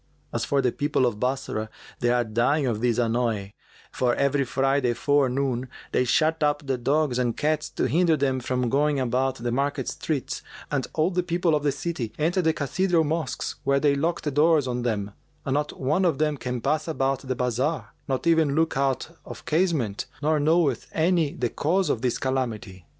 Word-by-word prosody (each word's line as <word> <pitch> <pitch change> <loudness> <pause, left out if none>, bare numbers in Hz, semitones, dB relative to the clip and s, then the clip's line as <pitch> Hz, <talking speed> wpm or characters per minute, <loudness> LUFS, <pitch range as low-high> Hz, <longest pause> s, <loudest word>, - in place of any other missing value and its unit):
As - - -1
for 140 -1 +1
the 125 - +2
people 145 -2 +1
of 110 -4 -1
Bassorah 125 -4 -2 0.3
they 120 - +1
are 120 0 +3
dying 120 +7 +1
of 115 -4 -1
this 120 -2 +1
annoy; 115 -4 0 0.4
for 125 -1 +1
every 140 0 +1
Friday 135 -1 +1
forenoon 135 -2 +1 0.2
they 125 - +2
shut 160 +6 +2
up 145 -1 +1
the 135 -2 -1
dogs 140 0 +1
and 120 -2 0
cats, 155 0 0
to - - -3
hinder 160 +5 +3
them 135 -2 0
from 125 0 -1
going 145 +3 +2
about 130 +1 0
the 120 -1 -3
market 140 +1 -1
streets, 145 -6 -3 0.3
and 140 -3 -1
all 160 +3 +1
the 180 0 +1
people 175 -1 0
of 150 - +2
the 145 -1 +1
city 140 -6 -4
enter 170 +5 +1
the 160 -2 +3
cathedral 165 +4 +1
mosques, 155 -4 -2
where 140 0 +2
they 145 0 +3
lock 165 +5 -1
the 150 - -1
doors 150 0 +3
on 125 -1 -2
them[FN#399] 105 -4 -2 0.3
and 135 - 0
not 150 +1 -2
one 150 +8 +1
of 165 -6 +2
them 150 0 +1
can 125 -3 -4
pass 155 +4 0
about 135 -4 0
the 130 -1 -4
bazar 125 +1 -1 0.2
nor 135 -2 0
even 160 -4 +3
look 160 0 +1
out 135 +4 -1
of - - -10
casement; 155 - 0 0.2
nor 155 0 +2
knoweth 155 +1 +2
any 165 -2 +2
the 125 -2 -1
cause 180 +9 +1
of 110 - -2
this 125 -2 0
calamity. 115 -9 -3
140 Hz, 195 wpm, -25 LUFS, 125-155 Hz, 0.4 s, are